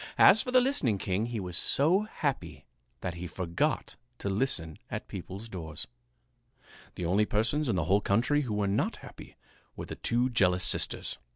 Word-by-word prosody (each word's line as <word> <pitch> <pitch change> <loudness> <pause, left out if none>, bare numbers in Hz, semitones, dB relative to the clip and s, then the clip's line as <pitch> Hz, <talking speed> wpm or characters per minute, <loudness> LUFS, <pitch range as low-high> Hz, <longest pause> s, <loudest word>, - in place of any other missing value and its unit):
As 220 - +7
for - - -5
the 255 0 +5
listening 200 - +1
king, 95 +4 -1
he 120 -2 -4
was 90 -3 -3
so 160 - +3
happy 145 - -4 0.4
that 90 - -3
he 85 +1 -6
forgot 85 0 -2 0.2
to 100 - -4
listen 95 - -1
at - - -5
people's 100 +5 -8
doors. 80 -7 -7 1.1
The 90 - -4
only 100 +5 +2
persons 120 +7 0
in 110 - +1
the 90 - 0
whole 100 +4 +3
country 120 +10 +2
who 120 -7 -3
were 105 -1 0
not 100 +1 0
happy - - -12 0.4
were - - -6
the - - -7
two 120 +2 0
jealous 90 -6 +2
sisters. - - +2
105 Hz, 175 wpm, -29 LUFS, 90-130 Hz, 1.1 s, As